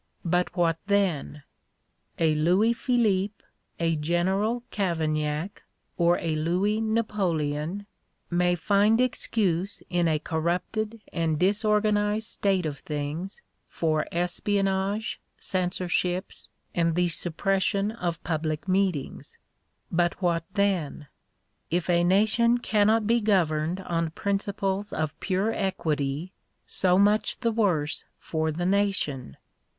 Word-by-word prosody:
But 180 +1 0
what 165 -2 +2
then? 180 -8 0 0.7
A 160 -2 +3
Louis 180 +9 +3
Philippe, 210 -5 0 0.4
a 165 -1 +1
General 190 +9 0
Cavaignac, 160 -2 -1 0.3
or 175 0 +3
a 160 -2 -2
Louis 185 +7 +1
Napoleon, 190 -6 -1 0.5
may 175 0 +2
find 205 +6 +3
excuse 200 -7 0
in 175 -1 +2
a 155 -1 +2
corrupted 180 +8 -2
and 165 -2 0
disorganized 210 +2 +2
state 190 -3 0
of 145 -3 -4
things 150 +6 -5 0.2
for 155 -2 0
espionnage, 195 +3 -1 0.2
censorships, 180 0 -2 0.2
and 170 -1 +1
the 180 0 +3
suppres 180 +4 0
sion 200 +2 +1
of 175 -8 -4
public 155 +1 -2
meetings. 185 -6 -1 0.5
But 175 0 +1
what 170 -3 0
then? 180 -8 0 0.6
If 175 +1 0
a 175 0 +3
nation 220 +6 +3
cannot 215 -1 +2
be 235 +2 +3
governed 175 -4 +1
on 165 -3 -1
principles 200 +2 -2
of 155 -1 -3
pure 200 +4 0
equity, 155 -3 -2 0.3
so 180 -1 +2
much 205 +5 +2
the 230 -2 +2
worse 180 -9 0
for 160 -1 -2
the 175 +3 -3
nation. 185 - 0
180 Hz, 110 wpm, -26 LUFS, 165-205 Hz, 0.7 s, A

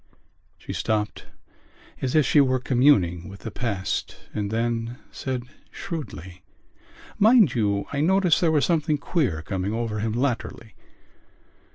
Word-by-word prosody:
She - - -7
stopped, 105 -1 -2 0.7
as 130 +1 -1
if 155 -3 +5
she 150 - +5
were 130 -1 +2
communing 115 - +2
with 100 0 -11
the 110 - -6
past 100 -6 -3 0.2
and 105 -1 -2
then 115 +1 -2
said 130 -2 -4 0.3
shrewdly: 95 - -7 0.8
"Mind 215 - +6
you, 100 -3 0
I 140 - 0
noticed 185 +1 +3
there 165 -2 +3
was 150 -3 +3
something 155 -3 +1
queer 140 - -1
coming 95 +3 -3
over 115 -2 -2
him 110 +1 -1
latterly. 120 -3 -2
120 Hz, 135 wpm, -24 LUFS, 105-145 Hz, 0.8 s, Mind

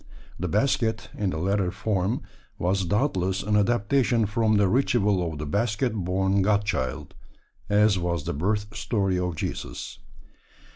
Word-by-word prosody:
The 90 - -1
basket, 110 - 0
in 100 -2 -1
the 80 - -3
latter 95 +2 +1
form, 95 +2 -1 0.3
was 95 +2 0
doubtless 95 - 0
an 105 +1 0
adaptation 115 +2 +2
from 110 +1 +2
the 100 -1 +4
ritual 100 -6 +2
of 75 - -7
the 75 - -4
basket 110 - 0
born 95 0 +1
God 105 +1 +2
Child, 65 -11 -3 0.6
as 105 -1 +4
was 85 -3 -1
the - - -3
birth 105 +7 -1
story 100 -3 0
of 90 -2 -2
Jesus. - - -5
100 Hz, 145 wpm, -26 LUFS, 90-110 Hz, 0.6 s, the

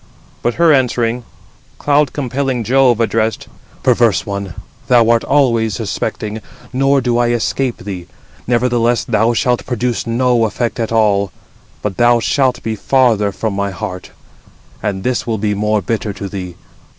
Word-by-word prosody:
But 120 - 0
her 170 -2 +5
answering, 120 -2 0 0.5
cloud 145 -1 +2
compelling 130 -2 -2
Jove 125 0 +3
addressed: 115 -1 0 0.4
"Perverse - - +3
one! 100 -3 -5 0.3
thou 120 -2 +5
art 115 -1 +2
always 115 -7 +2
suspecting, 110 +1 -4 0.3
nor 135 +1 +3
do 120 -1 +1
I 120 - +3
escape 120 +2 -1
thee. 95 -4 -7 0.4
Nevertheless 120 -1 +1
thou 115 +2 +1
shalt 125 +1 +1
produce 125 -1 -2
no 120 0 +2
effect 115 +2 -2
at 115 -1 -2
all, 100 -4 +2 0.5
but 100 -3 -3
thou 120 0 +4
shalt 130 +1 +1
be 110 -1 -2
farther 110 -3 +2
from 110 +2 -3
my 100 0 -1
heart: 95 -2 -6 0.7
and 95 -2 -3
this 125 -1 -1
will 115 -1 0
be 105 0 -1
more 105 0 0
bitter 110 0 -2
to 100 0 -6
thee. 90 -3 -6
115 Hz, 150 wpm, -16 LUFS, 105-125 Hz, 0.7 s, her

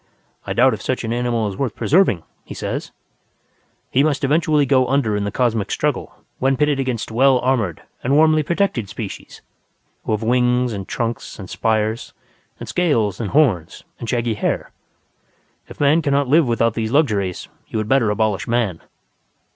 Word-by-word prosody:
"I - - -1
doubt 130 +1 +4
if 105 - -5
such 130 +2 -2
an 115 0 -2
animal 120 -2 0
is 100 - -5
worth 130 -6 -2
preserving," 140 - +2 0.2
he - - -9
says. - - -4 1.0
"He 135 - +3
must 145 -2 0
eventually 150 +1 +2
go 130 -1 +3
under 130 -6 +1
in 105 0 -1
the 100 - -2
cosmic 115 -4 0
struggle - - -2 0.2
when 135 0 +2
pitted 150 -2 +1
against 125 -5 -2
well 130 +3 +4
armoured 125 -9 -1 0.2
and 135 +3 +2
warmly 155 0 +5
protected 155 - -1
species, - - -8 0.6
who - - -3
have 110 +1 -2
wings 125 +1 +2
and 95 -2 -6
trunks 115 -1 -4
and 95 - -8
spires 110 0 -1 0.5
and - - -7
scales 115 - 0
and 105 - -3
horns 115 - +1 0.2
and 115 - -6
shaggy 120 -2 0
hair. 105 - -2 1.0
If - - -13
Man 145 +3 +4
cannot 140 -2 +1
live 150 +2 +4
without 115 -1 +1
these 110 -1 -2
luxuries, 105 - 0 0.2
you - - -4
had 110 -1 -2
better 120 -2 +3
abolish 105 -3 0
Man." 115 -8 0
120 Hz, 170 wpm, -20 LUFS, 110-140 Hz, 1.0 s, warmly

